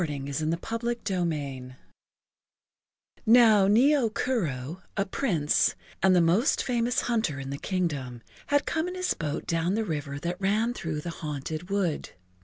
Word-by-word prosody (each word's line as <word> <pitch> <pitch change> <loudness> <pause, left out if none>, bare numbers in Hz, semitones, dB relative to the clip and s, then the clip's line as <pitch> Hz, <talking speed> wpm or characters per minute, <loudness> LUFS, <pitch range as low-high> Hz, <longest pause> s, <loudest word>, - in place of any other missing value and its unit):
[Pg 140 -4 -3
20] 155 +2 0
CHAPTER 230 -2 -2
II 140 -8 -3 1.5
NOW 220 -4 +7
Nio 245 +3 +4
Kuro, 170 - -2 0.2
a 195 - +1
Prince 190 - +1 0.3
and 190 -1 +5
the - - +6
most 175 - +3
famous 240 -1 +1
hunter 220 - -1
in 135 0 -6
the 140 - -5
kingdom, 140 - -2 0.2
had 285 0 +2
come 320 +1 -1
in 360 - -5
his 365 0 0
boat 150 -2 -4
down 170 +3 0
the 220 0 0
river 145 -5 -3
that 175 +5 -4
ran 215 +5 +1
through 160 -8 -4
the 170 - -5
haunted 155 +2 -5
wood. 195 -6 -1
180 Hz, 150 wpm, -27 LUFS, 150-225 Hz, 1.5 s, NOW